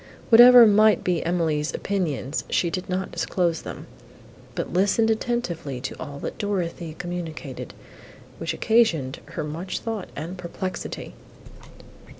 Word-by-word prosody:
Whatever 245 Hz, +1 st, +10 dB
might 215 Hz, 0 st, +5 dB
be 175 Hz, -3 st, 0 dB
Emily's 160 Hz, -3 st, 0 dB
opinions, 160 Hz, -8 st, -2 dB
she 170 Hz, -, +1 dB
did 185 Hz, +3 st, -4 dB
not 185 Hz, +1 st, -2 dB
disclose 170 Hz, -3 st, -1 dB
them, -, -, -8 dB, 0.7 s
but -, -, -4 dB
listened 205 Hz, +5 st, +3 dB
attentively 215 Hz, -, -2 dB
to 130 Hz, -, -5 dB
all 140 Hz, 0 st, -7 dB
that -, -, -6 dB
Dorothée 175 Hz, -5 st, -3 dB
communicated, 175 Hz, -2 st, -6 dB, 0.6 s
which -, -, -2 dB
occasioned 170 Hz, -, +2 dB, 0.2 s
her -, -, -2 dB
much 165 Hz, +5 st, -4 dB
thought 225 Hz, -4 st, -5 dB
and 170 Hz, +5 st, -6 dB
perplexity. 185 Hz, +2 st, -5 dB
180 Hz, 125 wpm, -24 LUFS, 160-205 Hz, 0.7 s, Whatever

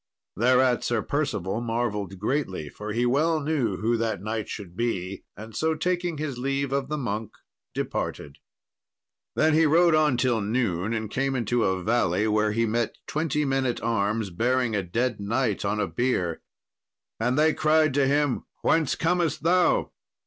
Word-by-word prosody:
Thereat 125 Hz, +2 st, +3 dB
Sir 115 Hz, -3 st, 0 dB
Percival 110 Hz, -, -1 dB
marvelled 110 Hz, -5 st, -2 dB
greatly, 100 Hz, -, -2 dB
for 105 Hz, +6 st, -7 dB
he 120 Hz, +3 st, +1 dB
well 155 Hz, +6 st, +2 dB
knew 140 Hz, -10 st, 0 dB
who 115 Hz, +3 st, +1 dB
that 115 Hz, -3 st, -1 dB
knight 110 Hz, +2 st, -4 dB
should 90 Hz, -4 st, -7 dB
be; 100 Hz, -4 st, -3 dB
and 110 Hz, +1 st, -10 dB
so, 160 Hz, +5 st, +1 dB
taking 175 Hz, 0 st, -1 dB
his 145 Hz, -4 st, -4 dB
leave 135 Hz, +1 st, -1 dB
of 140 Hz, -1 st, -1 dB
the 150 Hz, -, -1 dB
monk, 110 Hz, -5 st, -3 dB, 0.4 s
departed. 70 Hz, -1 st, -4 dB, 1.0 s
Then 155 Hz, 0 st, +3 dB
he 160 Hz, +1 st, +5 dB
rode 170 Hz, +2 st, +5 dB
on 155 Hz, -5 st, +3 dB
till 125 Hz, -3 st, +1 dB
noon, 105 Hz, -3 st, -1 dB
and 110 Hz, -2 st, -3 dB
came 135 Hz, 0 st, 0 dB
into 120 Hz, -1 st, +1 dB
a 95 Hz, -1 st, 0 dB
valley 105 Hz, -2 st, +1 dB
where 105 Hz, 0 st, +2 dB
he 115 Hz, +2 st, +1 dB
met 115 Hz, +1 st, -1 dB
twenty 150 Hz, -1 st, -1 dB
men 135 Hz, -1 st, +1 dB
at 120 Hz, -, -3 dB
arms 110 Hz, -2 st, 0 dB
bearing 120 Hz, +4 st, +1 dB
a 100 Hz, -, +1 dB
dead 115 Hz, +6 st, -1 dB
knight 110 Hz, +1 st, -1 dB
on 105 Hz, +1 st, -1 dB
a -, -, +1 dB
bier. 95 Hz, -10 st, -1 dB, 0.8 s
And 125 Hz, +4 st, +1 dB
they 155 Hz, +1 st, +4 dB
cried 155 Hz, -1 st, +3 dB
to 140 Hz, -1 st, +3 dB
him, 145 Hz, -1 st, +1 dB, 0.2 s
"Whence 160 Hz, -4 st, +2 dB
comest 165 Hz, -3 st, 0 dB
thou?" 180 Hz, +1 st, +3 dB
120 Hz, 165 wpm, -26 LUFS, 105-145 Hz, 1.0 s, he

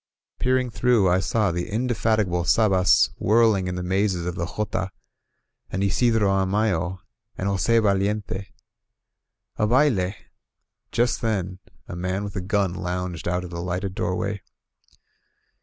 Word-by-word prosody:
Peering 130 Hz, -1 st, +1 dB
through, 120 Hz, -3 st, +3 dB
I 90 Hz, +1 st, +3 dB
saw 105 Hz, 0 st, +1 dB
the 90 Hz, +5 st, -3 dB
indefatigable 110 Hz, -5 st, 0 dB
Sabas 95 Hz, -2 st, +4 dB
whirl 110 Hz, +1 st, +4 dB
ing 95 Hz, -2 st, -2 dB
in 90 Hz, -, -3 dB
the 90 Hz, -, -4 dB
mazes 95 Hz, -1 st, 0 dB
of 90 Hz, -, -2 dB
the 85 Hz, -2 st, -3 dB
jota, 100 Hz, -2 st, -3 dB, 0.8 s
and 95 Hz, +1 st, -2 dB
Isidro 110 Hz, +1 st, +2 dB
Amayo, 95 Hz, -2 st, +1 dB, 0.4 s
and 95 Hz, -, -2 dB
Jos^ 110 Hz, +4 st, +2 dB
Valiente. 100 Hz, -1 st, 0 dB, 1.1 s
A 105 Hz, -, +2 dB
baUe! 115 Hz, -7 st, +2 dB, 0.8 s
Just 120 Hz, 0 st, +1 dB
then 95 Hz, -5 st, -2 dB, 0.3 s
a -, -, -6 dB
man 90 Hz, +3 st, -2 dB
with 100 Hz, -1 st, -6 dB
a 95 Hz, -, -2 dB
gun 95 Hz, -1 st, 0 dB
lounged 90 Hz, -3 st, -4 dB
out 90 Hz, +1 st, -1 dB
of 90 Hz, -, -8 dB
the 85 Hz, 0 st, -5 dB
lighted 90 Hz, +2 st, -3 dB
doorway. 100 Hz, +1 st, -2 dB
95 Hz, 140 wpm, -24 LUFS, 90-110 Hz, 1.1 s, Sabas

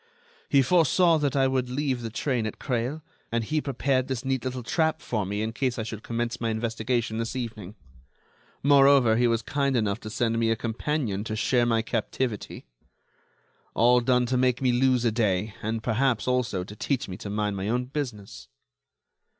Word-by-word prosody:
He 140 Hz, -1 st, +5 dB
foresaw 170 Hz, +2 st, +4 dB
that 145 Hz, -3 st, 0 dB
I 135 Hz, -1 st, +3 dB
would 130 Hz, -1 st, -1 dB
leave 130 Hz, -1 st, -1 dB
the 115 Hz, -, -4 dB
train 120 Hz, 0 st, -1 dB
at 110 Hz, -, -6 dB
Creil, 130 Hz, +4 st, -2 dB, 0.3 s
and 115 Hz, 0 st, 0 dB
he 155 Hz, +7 st, -1 dB
prepared 135 Hz, -1 st, 0 dB
this 130 Hz, -1 st, -4 dB
neat 130 Hz, -2 st, -1 dB
little 130 Hz, -1 st, -4 dB
trap 160 Hz, +3 st, 0 dB
for 105 Hz, -9 st, -2 dB
me 105 Hz, +2 st, -2 dB
in 110 Hz, +1 st, -3 dB
case 125 Hz, 0 st, -1 dB
I 110 Hz, -, -2 dB
should 110 Hz, -1 st, -6 dB
commence 120 Hz, 0 st, -3 dB
my 115 Hz, -, 0 dB
investigation 115 Hz, 0 st, -1 dB
this 115 Hz, +2 st, -3 dB
evening. 110 Hz, -5 st, -5 dB, 0.9 s
Moreover, 140 Hz, -4 st, +6 dB
he 120 Hz, +1 st, +3 dB
was 115 Hz, -1 st, 0 dB
kind 140 Hz, +1 st, 0 dB
enough 105 Hz, -3 st, 0 dB
to 110 Hz, -, -8 dB
send 115 Hz, 0 st, 0 dB
me 115 Hz, -1 st, +2 dB
a 115 Hz, -, +2 dB
companion 115 Hz, -2 st, -2 dB
to 110 Hz, -, -3 dB
share 120 Hz, +2 st, +2 dB
my 115 Hz, -1 st, +2 dB
captivity. 120 Hz, -2 st, -3 dB, 1.1 s
All 120 Hz, +2 st, +5 dB
done 125 Hz, 0 st, +2 dB
to 125 Hz, +1 st, 0 dB
make 125 Hz, -1 st, +2 dB
me 130 Hz, -2 st, +2 dB
lose 125 Hz, 0 st, +2 dB
a 115 Hz, -, +3 dB
day, 105 Hz, -2 st, 0 dB
and, 110 Hz, +1 st, -3 dB
perhaps, 125 Hz, 0 st, +1 dB
also, 125 Hz, -7 st, 0 dB
to 105 Hz, +3 st, -10 dB
teach 135 Hz, +3 st, -2 dB
me 95 Hz, -, -6 dB
to 100 Hz, -, -7 dB
mind 105 Hz, 0 st, -1 dB
my 95 Hz, +2 st, -3 dB
own 125 Hz, +2 st, 0 dB
business." 105 Hz, -, -6 dB
120 Hz, 190 wpm, -26 LUFS, 110-130 Hz, 1.1 s, Moreover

